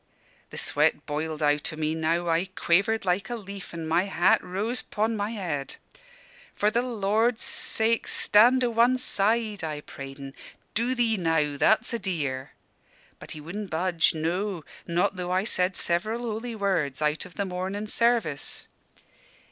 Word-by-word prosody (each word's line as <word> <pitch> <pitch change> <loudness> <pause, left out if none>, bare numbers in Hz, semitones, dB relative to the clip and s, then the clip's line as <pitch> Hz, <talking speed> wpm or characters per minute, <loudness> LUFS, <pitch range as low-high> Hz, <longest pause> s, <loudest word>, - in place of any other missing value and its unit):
"The - - -9
sweat - - +1
boiled 155 +1 -3
out 145 0 +1
o' - - -7
me 155 0 -1
now. 165 +2 0
I 165 +2 +2
quavered 200 +5 +2
like 185 +3 0
a 240 - -2
leaf, 200 -3 -8
and 165 -1 -5
my 170 +4 +2
hat 175 -3 +3
rose 205 +7 -2
'pon 220 +2 -1
my 205 0 -2
head. 175 -11 -4 0.8
'For 210 +1 +2
the 235 - +2
Lord's 225 0 +1
sake, 225 +1 +1
stand 245 +5 +4
o' 240 - +1
one 235 +3 +4
side,' 215 -3 +2
I 155 -2 -3
prayed 135 -1 -9
en; 135 -1 -8 0.4
'do'ee 235 -1 +1
now, 160 -4 +1
that's 220 - +3
a 235 - -1
dear!' 145 -10 -3 0.7
But - - -9
he 155 - -8
wudn' 200 +7 -6
budge; 170 -1 +1
no, 175 +2 -2 0.2
not 180 +3 +1
though 180 -1 -3
I 185 +1 +2
said 185 -3 +1
several 215 +7 -1
holy 230 0 -4
words 185 -10 0
out 150 +1 0
of - - -13
the 200 - -1
Mornin' 190 +3 -3
Service. 225 -10 0
190 Hz, 160 wpm, -26 LUFS, 160-220 Hz, 0.8 s, stand